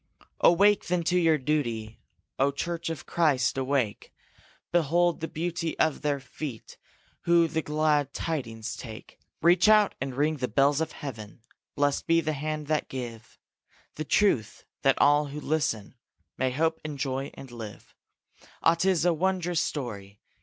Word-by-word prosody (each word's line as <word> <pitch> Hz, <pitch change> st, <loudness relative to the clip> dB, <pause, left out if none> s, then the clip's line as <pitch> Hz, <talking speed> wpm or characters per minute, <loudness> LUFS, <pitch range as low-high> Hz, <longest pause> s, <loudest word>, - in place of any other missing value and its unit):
Awake, 200 Hz, +4 st, +4 dB
then, 180 Hz, -1 st, 0 dB
to 180 Hz, +2 st, +1 dB
your 165 Hz, -2 st, +4 dB
duty, 120 Hz, -7 st, -2 dB, 0.4 s
O 135 Hz, +1 st, +4 dB
church 170 Hz, +3 st, -3 dB
of 165 Hz, -, -5 dB
Christ, 145 Hz, -7 st, +2 dB
awake! 130 Hz, -5 st, -1 dB, 0.6 s
Behold 175 Hz, +1 st, +2 dB
the 160 Hz, -, -3 dB
beauty 165 Hz, 0 st, -3 dB
of 155 Hz, -2 st, +1 dB
their 145 Hz, -1 st, 0 dB
feet 135 Hz, -3 st, -8 dB, 0.5 s
Who 170 Hz, -1 st, +5 dB
the 160 Hz, 0 st, -1 dB
glad 150 Hz, -2 st, +1 dB
tidings 115 Hz, -10 st, -4 dB
take! 110 Hz, -3 st, -10 dB, 0.2 s
Reach 175 Hz, +4 st, +5 dB
out 215 Hz, -2 st, +5 dB
and 135 Hz, -2 st, -3 dB
ring 150 Hz, +3 st, +1 dB
the 125 Hz, -2 st, -2 dB
bells 140 Hz, +6 st, +2 dB
of 160 Hz, -, -2 dB
heaven; 115 Hz, -6 st, -8 dB, 0.3 s
Blest 145 Hz, 0 st, 0 dB
be 165 Hz, 0 st, +4 dB
the 155 Hz, -1 st, -1 dB
hands 150 Hz, +1 st, -4 dB
that 155 Hz, -1 st, 0 dB
give 120 Hz, -4 st, -7 dB, 0.6 s
The 155 Hz, -, -4 dB
truth, 145 Hz, -, +1 dB, 0.2 s
that 135 Hz, -, +3 dB
all 145 Hz, +1 st, +4 dB
who 145 Hz, +2 st, -6 dB
listen 145 Hz, -9 st, -1 dB, 0.4 s
May 130 Hz, -, 0 dB
hope 160 Hz, +5 st, 0 dB
and 150 Hz, -2 st, -5 dB
joy 135 Hz, 0 st, -2 dB
and 135 Hz, -2 st, -11 dB
live! 110 Hz, -4 st, -9 dB, 0.7 s
Ah, 165 Hz, -, +6 dB
'tis 175 Hz, 0 st, +1 dB
a 175 Hz, -, +4 dB
wondrous 175 Hz, 0 st, 0 dB
story! 105 Hz, -10 st, -5 dB
150 Hz, 155 wpm, -27 LUFS, 130-165 Hz, 0.7 s, Ah